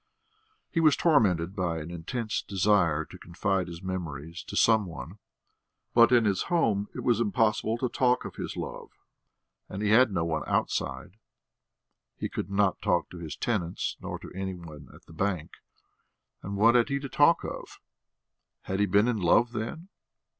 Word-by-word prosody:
He 165 - 0
was 155 -3 +5
tormented 100 - +2
by 85 -4 -1
an 80 +1 -6
intense 105 +7 -3
desire 95 -6 +2
to - - -13
confide 95 +1 -1
his 85 +1 -9
memories 85 -3 -5
to - - -6
some 110 -3 +4
one. 85 +3 -9 0.7
But 115 0 +6
in 120 -2 +5
his 100 -3 +1
home 110 - +1
it - - -4
was 120 -3 +2
impossible 110 0 +1
to 125 - -1
talk 125 +1 +1
of - - -6
his - - -6
love, - - -6 0.8
and 100 +2 -5
he 105 - +1
had 120 +1 +6
no 85 -3 0
one 80 -2 -1
outside; 65 +10 -2 1.0
he - - -3
could - - -4
not 100 -1 +1
talk - - 0
to 90 - -9
his 80 -3 -6
tenants 90 -8 -2
nor - - -5
to - - -11
any 95 0 -4
one 75 -6 -11
at - - -17
the - - -15
bank. 90 -2 -2 0.9
And 100 +1 -5
what 115 +3 +5
had 120 +2 +3
he 140 - 0
to 140 0 -5
talk 145 +5 +4
of? - - -7 0.8
Had 95 +1 -3
he 105 - +3
been 100 +4 +3
in 120 -3 0
love, 115 +7 +3
then? 120 - -5
100 Hz, 175 wpm, -28 LUFS, 85-115 Hz, 1.0 s, But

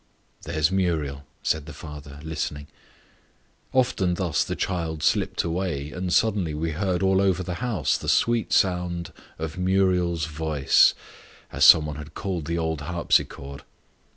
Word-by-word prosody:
"There's 80 +2 +1
Muriel," 80 -7 -1 0.2
said 80 -1 -1
the 75 - -8
father, 75 -3 -10
listening. 75 -2 -4 1.1
Often 120 -9 +1
thus 85 -5 0
the - - -4
child 80 -4 -3
slipped - - +1
away, 85 -4 -2
and 90 0 -4
suddenly 95 -6 +1
we 80 +2 -2
heard 90 +2 -1
all 95 0 +3
over 95 -1 +1
the 90 - -4
house 115 - 0
the - - -4
sweet 120 -1 +2
sounds 90 -2 +1 0.3
of 80 +2 -5
"Muriel's 90 -3 +1
voice," 80 -3 +3 0.6
as - - +3
some 80 - +8
one 75 -1 -5
had 75 0 -10
called 90 -6 -3
the 85 0 -1
old 80 -2 -2
harpsichord. 70 -3 -1
85 Hz, 145 wpm, -25 LUFS, 75-95 Hz, 1.1 s, some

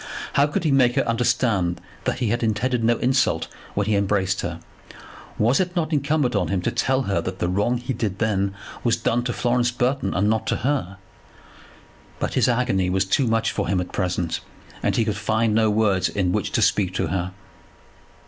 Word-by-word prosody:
How 140 +1 +4
could 150 - -2
he 155 - +2
make 130 -2 +4
her 140 - +1
understand 115 -6 +1 0.3
that - - 0
he 120 -4 -1
had 120 +2 0
intended 115 +2 0
no 115 +1 +3
insult 130 +2 +1 0.3
when 100 - +1
he 105 0 +1
embraced 95 -1 +1
her? 85 -1 -4 0.8
Was 120 +5 +3
it 180 -1 -1
not 165 -2 -1
incumbent 140 -2 +1
on - - +1
him 100 - 0
to - - 0
tell 130 0 +1
her 100 -7 0
that 95 +2 -5
the 90 - -1
wrong 105 +7 +1
he 125 +2 -4
then 105 -5 -2 0.3
did 100 - -4 0.3
was 120 -1 +3
done 120 +1 0
to 125 - 0
Florence 120 0 +1
Burton, 125 +3 -1
and 95 +3 +2
not 110 0 0
to - - +1
her? 130 -10 -1 1.2
But - - -2
his - - +3
agony 115 -7 +1
was 95 +1 +1
too 130 +7 +1
much 115 0 +1
for - - -2
him 90 +1 +1
at 90 - -4
present, 90 -3 -1 0.4
and - - 0
he 115 - +2
could 105 -2 -1
find 110 +1 +1
no 110 0 +3
words 105 -4 +2
in 95 -3 0
which - - -1
to - - +2
speak 95 -3 +1
to - - 0
her. 90 +1 -2
110 Hz, 205 wpm, -23 LUFS, 95-125 Hz, 1.2 s, How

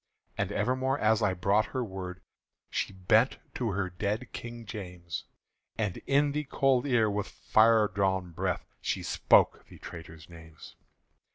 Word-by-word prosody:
And - - -1
evermore 130 +2 0
as 110 -3 +3
I 95 -3 +2
brought 100 +4 +2
her 125 - +1
word, 95 -3 -6 0.5
She - - -1
bent 95 -2 +3 0.2
to 120 - -1
her 95 -1 -1
dead 105 +7 -3
King 120 -1 -7
James, 90 -5 -6 0.5
And 105 -5 -1
in 145 +1 +3
the 150 +1 -2
cold 135 -1 +2
ear 120 -5 +3
with 105 0 -1
fire 110 -1 +4
drawn 95 -3 0
breath 80 - -2 0.2
She - - -2
spoke - - +3
the - - -14
traitors' 80 -2 -10
names. 80 -2 -13
105 Hz, 150 wpm, -29 LUFS, 90-120 Hz, 0.5 s, fire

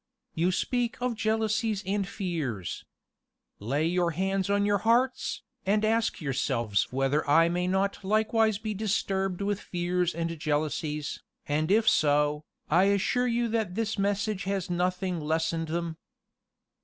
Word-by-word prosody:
You 170 +3 +1
speak 240 +4 -1
of 250 0 0
jealousies 220 -1 0
and 195 0 -1
fears. 160 - -4 0.7
Lay 140 +9 0
your 175 +1 +1
hands 195 0 0
on 200 0 +2
your 205 -1 +2
hearts, 245 +5 +1 0.2
and 210 +2 +2
ask 225 0 +1
yourselves 120 - 0
whether 135 +3 0
I 165 +3 +5
may 180 +1 0
not 195 +2 0
likewise 220 +1 +2
be 215 0 -4
disturbed 195 -2 -1
with 205 0 -1
fears 175 0 -1
and 165 -1 -3
jealousies, 150 0 -2 0.2
and 155 +2 0
if 220 +3 +3
so, 150 -1 +3 0.2
I 175 +5 +4
assure 200 +5 +2
you 235 0 +1
that 220 -5 -1
this 220 -1 -1
message 200 0 0
has 195 -2 -2
nothing 180 0 -1
lessened 160 +1 -1
them. 165 0 -3
190 Hz, 140 wpm, -28 LUFS, 160-215 Hz, 0.7 s, I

